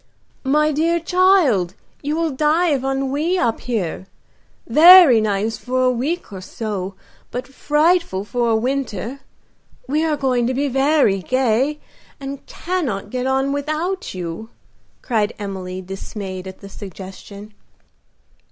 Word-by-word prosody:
"My 300 +2 +3
dear 330 +3 +1
child, 335 - +3 0.3
you 295 +2 -2
will 330 -1 0
die 310 +5 +2
of 275 -4 0
ennui 275 +6 0
up 235 -9 0
here. 190 -6 -3 0.6
Very 315 -2 +8
nice 215 +1 -1
for 255 0 -1
a 255 - +4
week 265 - -3
or 190 - -7
so, 195 -1 -5 0.3
but 250 +1 -5
frightful 295 - +1
for 240 +1 -1
a 225 - +3
winter. 250 0 -2 0.7
We 300 +4 +1
are 310 -2 0
going 250 -4 +1
to 255 - -1
be 285 +2 0
very 270 -7 +2
gay, 255 +6 +1 0.4
and 275 0 -7
cannot 270 - -3
get 255 0 -2
on 270 +1 +1
without 310 - -3
you," 180 +5 -6 0.5
cried 220 -3 0
Emily 185 -2 -6
dismayed 190 0 -7
at 190 - -10
the 200 - -9
suggestion. 200 +2 -10
255 Hz, 135 wpm, -20 LUFS, 205-300 Hz, 0.7 s, Very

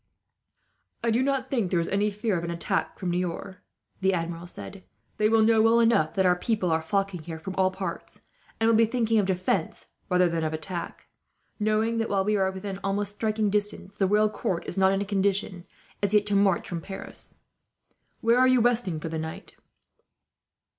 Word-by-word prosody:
"I 230 - +2
do 235 +3 +2
not 265 -1 -1
think 230 -9 0
there 175 - +1
is 165 - -1
any 205 +2 +1
fear 210 0 -1
of 170 - -2
an 170 - -3
attack 170 0 -2
from 180 -2 -2
Niort," 180 +2 -3 0.4
the 190 0 +2
Admiral 170 0 -4
said. 185 +1 -6 0.3
"They 215 0 +3
will 225 0 +4
know, 220 0 +4
well 225 +1 +5
enough, 225 -10 +3
that 190 -1 +2
our 180 -1 +5
people 185 -2 -1
are 160 0 +2
flocking 195 +1 -1
here 160 0 -7
from 185 +4 -6
all 190 0 +3
parts; 190 -2 -6 0.4
and 225 - +2
will 230 - +5
be 225 0 +5
thinking 225 -2 +1
of 200 - +1
defence, 185 -2 -1 0.2
rather 180 0 +4
than 165 -1 -1
of 155 0 -1
attack, 170 +3 -6 0.5
knowing 215 +2 +1
that, 225 0 -1
while 195 -1 +1
we 210 +1 +2
are 190 -2 +2
almost 190 - -4
within 195 0 -2
striking 215 +1 -1
distance, 205 -1 -2
the 195 -2 +1
royal 210 +2 +2
army 185 -7 -1
is - - -2
not 190 0 +4
in 195 0 0
a - - -2
condition, 195 -2 -1 0.3
as 200 +1 +1
yet, 210 0 +4
to 205 -1 0
march 195 -3 +2
from 170 -2 -4
Paris. 195 +3 -8 0.9
"Where 230 +2 +4
are 255 - +6
you 255 -1 +4
resting 230 -8 +1
for 160 - -5
the 160 0 -3
night?" 160 0 -7
195 Hz, 200 wpm, -26 LUFS, 180-215 Hz, 0.9 s, are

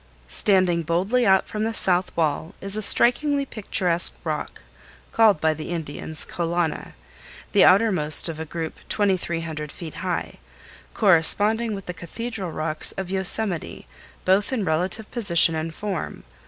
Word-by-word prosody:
Standing 185 -4 +2
boldly 195 +9 0
out 190 -1 +3
from 215 0 -4
the 225 0 -2
south 180 -2 +1
wall 160 +3 -2
is 195 +1 -1
a 215 - -2
strikingly 280 +6 +4
picturesque 180 -7 -1
rock - - -5 0.5
called 220 -6 +3
by 160 0 +1
the 155 +2 -8
Indians, 160 -1 -5
Kolana, 170 -1 -3 0.6
the - - +4
outermost 185 -8 +3
of 160 -2 -6
a - - -3
group 160 0 -6
2300 165 -6 -2
feet 165 -3 -9
high, - - -4 0.6
corresponding 210 +4 +4
with 195 - -9
the 180 - -6
Cathedral 200 +2 -6
Rocks 155 0 -2
of 190 -1 -6
Yosemite 190 -1 +1 0.4
both 195 +5 +2
in 230 -7 -2
relative 180 +7 -2
position 170 -8 +4
and 160 +1 -4
form. 195 -1 -6
180 Hz, 140 wpm, -23 LUFS, 165-210 Hz, 0.6 s, strikingly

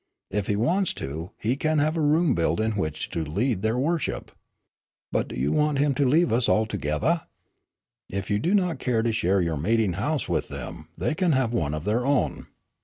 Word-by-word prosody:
If 105 -2 -1
he 105 - +1
wants 175 - +1
to, 80 +6 -5
he 115 +4 0
can 155 +2 0
have 155 +2 +2
a 165 - 0
room 155 0 +3
built 85 -3 +1
in 110 +1 +1
which 80 -7 -2
to 85 - -2
lead 100 - -1
their 110 +3 0
worship." 160 +4 -1 0.8
"But - - -1
you 65 +4 -1
do' - - +1
want 150 -1 +2
him 140 0 +2
to 135 +1 +2
leave 160 0 +3
us 120 +1 +2
altogethah?" 110 - 0 0.8
"If 100 0 -3
you 105 - +2
do 180 - +2
not 180 -4 +1
care 115 -4 +1
to 115 - +1
share 100 -3 +2
your 85 -3 -1
meeting 105 +4 +1
house - - -1
with - - -1
them, 80 -2 -7
they - - 0
can 175 0 +2
have 130 -3 +1
one 75 -9 0
of 75 - -5
their 110 +5 +1
own." 140 0 0
115 Hz, 205 wpm, -25 LUFS, 90-150 Hz, 0.8 s, room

